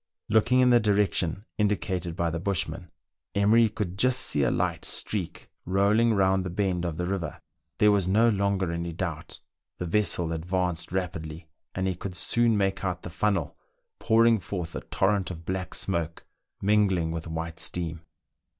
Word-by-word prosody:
Looking 115 +4 +4
in 125 -1 +5
the 120 - +6
direction 100 -3 0
indicated 95 -4 -1
by 85 -1 0
the 85 - -3
bushman, 90 -2 -2 0.5
Emery 110 +3 +4
could 100 -4 -4
just 125 +2 +3
see 75 - +1
a - - +3
light - - -1
streak 95 -6 -2 0.2
rolling 105 +5 +3
round 95 -1 +2
the 90 - -4
bend 90 -1 -1
of 80 -3 -3
the 90 - -1
river: 95 -1 -3 0.4
there 105 0 +5
was 100 -3 +2
no 110 +5 +4
longer 100 -4 +1
any 85 0 -3
doubt. 85 -2 -5 0.4
The 90 - -4
vessel 85 -2 +1
advanced 90 0 -2
rapidly, 80 -3 -4 0.3
and 95 - -1
he 95 - 0
could 90 +1 -7
soon 115 +4 +2
make 95 -1 0
out 90 -2 -2
the 90 - -7
funnel 95 -5 0 0.4
pouring 115 0 +4
forth 90 -2 -5
a - - -3
torrent 95 -1 0
of 85 -2 -8
black 95 +1 -3
smoke 85 -4 -2 0.4
mingling 95 -5 +2
with 85 0 -5
white 80 0 -5
steam. 85 -2 -3
95 Hz, 165 wpm, -27 LUFS, 85-105 Hz, 0.5 s, the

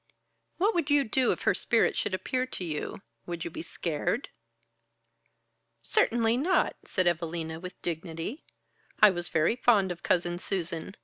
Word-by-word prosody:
"What 405 +5 +2
would 335 -4 0
you 290 -1 +5
do 255 +1 +2
if - - -3
her - - +4
spirit - - +2
should 190 - 0
appear 255 +6 -2
to 190 - -4
you? 155 -3 -4 0.2
Would 170 -1 -4
you 170 - -4
be - - -6
scared?" 170 - -2 1.5
"Certainly 230 - +2
not!" 355 +8 +2
said 185 -3 +1
Evalina, 165 -1 -1
with 180 +1 -9
dignity. 170 - -4 0.6
"I 210 -1 +8
was 175 -1 -3
very 160 +8 +2
fond 210 -7 +3
of 175 -1 -6
Cousin 175 0 0
Susan. 175 0 -4
180 Hz, 150 wpm, -29 LUFS, 170-240 Hz, 1.5 s, I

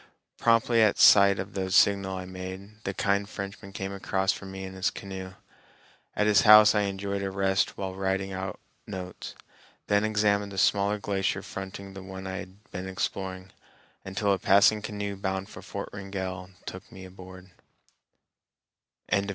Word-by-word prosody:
Promptly 115 0 +4
at 110 -2 +4
sight 100 -1 +7
of 100 +2 -5
the 95 -1 -2
signal 95 0 +3
I 95 - -6
made, 95 +4 -9
the 100 - -2
kind 100 0 0
Frenchman 100 0 -7
came 95 0 -5
across 95 -1 0
for 100 - -7
me 95 0 -7
in 95 0 -7
his 95 -1 0
canoe. 95 -1 -8 0.8
At 105 - +2
his 105 -1 +5
house 105 -1 +8
I 105 -1 +2
enjoyed 100 0 -3
a 100 - -2
rest 95 0 0
while 95 -1 -4
writing 95 0 -1
out 95 0 -5 0.3
notes; 90 -3 -7 0.5
then 100 0 +2
examined 105 -1 +1
the 95 - -8
smaller 100 +2 +2
glacier 100 -2 -1
fronting 95 0 -7
the 95 - -8
one 95 0 -8
I 95 0 -4
had 95 +2 -10
been 95 +1 -5
exploring, 95 0 -4 0.5
until 100 +1 0
a 95 - -1
passing 100 +2 +5
canoe 100 -1 -4
bound 95 0 -3
for - - -10
Fort - - -6
Wrangell 95 -2 -5 0.2
took 95 +1 -9
me 95 0 -10
aboard. 95 0 -12
95 Hz, 160 wpm, -27 LUFS, 95-100 Hz, 0.8 s, house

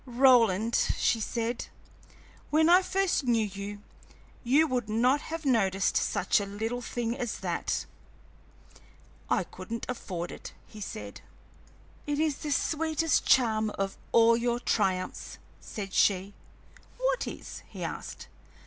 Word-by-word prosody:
"Roland," 235 -4 +4 0.2
she 230 - +2
said, 230 +2 -2 0.8
"when 315 +2 +4
I 365 +1 +8
first 380 -6 0
knew 230 -3 +2
you, 205 +1 -7 0.6
you 275 +6 +4
would 250 -7 -2
not 250 +6 +3
have 325 -1 -6
noticed 195 -7 +2
such 185 - +2
a 200 - -4
little 225 +5 -3
thing 235 -1 -3
as 245 -4 -3
that." - - -2 1.4
"I - - +2
couldn't 230 0 -7
afford 180 -8 -4
it," - - -9
he 215 - -12
said. 105 - -7 0.9
"It 290 -1 0
is 310 -2 +1
the 300 - -5
sweetest 315 +1 +1
charm 220 -4 +4
of 195 0 -2 0.2
all 230 0 +6
your 240 0 0
triumphs!" 185 -6 -1 0.2
said 195 -3 -7
she. 195 0 +2 0.6
"What - - 0
is?" - - -7
he - - -7
asked. - - -6
235 Hz, 130 wpm, -29 LUFS, 205-275 Hz, 1.4 s, I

